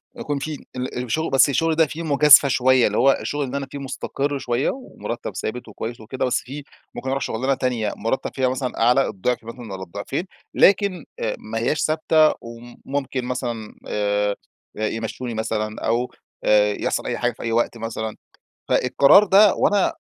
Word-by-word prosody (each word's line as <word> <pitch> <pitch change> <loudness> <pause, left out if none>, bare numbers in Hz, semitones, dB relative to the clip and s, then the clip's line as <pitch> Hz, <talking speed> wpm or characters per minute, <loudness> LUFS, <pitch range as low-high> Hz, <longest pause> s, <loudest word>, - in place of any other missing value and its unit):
يكون 145 -1 -3
في 150 +1 -6
ال 125 0 -3
الشغل 160 +7 -1
بس 135 +1 +5
الشغل 165 +3 +1
ده 160 0 +4
فيه 160 +2 -6
مجازفة 150 -1 +7
شويّة، 130 -1 +4
اللي 105 - -2
هو 135 - +5
الشغل 145 0 -2
اللي 135 +1 -3
أنا 140 -1 -4
فيه - - -6
مستقر 140 +1 -3
شويّة 120 0 0
ومرتب 185 - -6
ثابت 125 +2 -4
وكويّس 115 +2 -6
وكده، 120 +5 -3
بس 125 - +1
فيه 140 +3 -8 0.3
ممكن 130 - -4
أروح 135 +1 -1
شغلانة 130 +5 0
تانية، 125 -5 -1
مرتب 115 +4 -2
فيها 130 -2 +1
مثلًا 130 -2 -3
أعلى 125 +4 +4
الضعف 120 +5 -2
مثلًا 115 +2 -9
والّا 95 0 -6
الضعفين، 100 - -5 0.3
لكن، 195 -3 +3
آآ 110 - -1
ما 115 +1 -5
هياش 135 +6 0
ثابتة 155 0 +3
وم 115 +1 -11
ممكن 135 -2 -3
مثلًا 120 -3 -4
آآ 105 0 0 0.4
يمشوني 115 +3 -3
مثلًا 110 -1 -3
أو 120 +2 0 0.3
آآ 105 -1 +4
يحصل - - -2
أي - - -2
حاجة - - 0
في - - -10
أي 115 - -2
وقت 115 +1 0
مثلًا. 110 -1 -4 0.5
فالقرار 140 +10 +5
ده، 200 +1 +6
وأنا 205 -2 +2
125 Hz, 175 wpm, -22 LUFS, 115-140 Hz, 0.5 s, مجازفة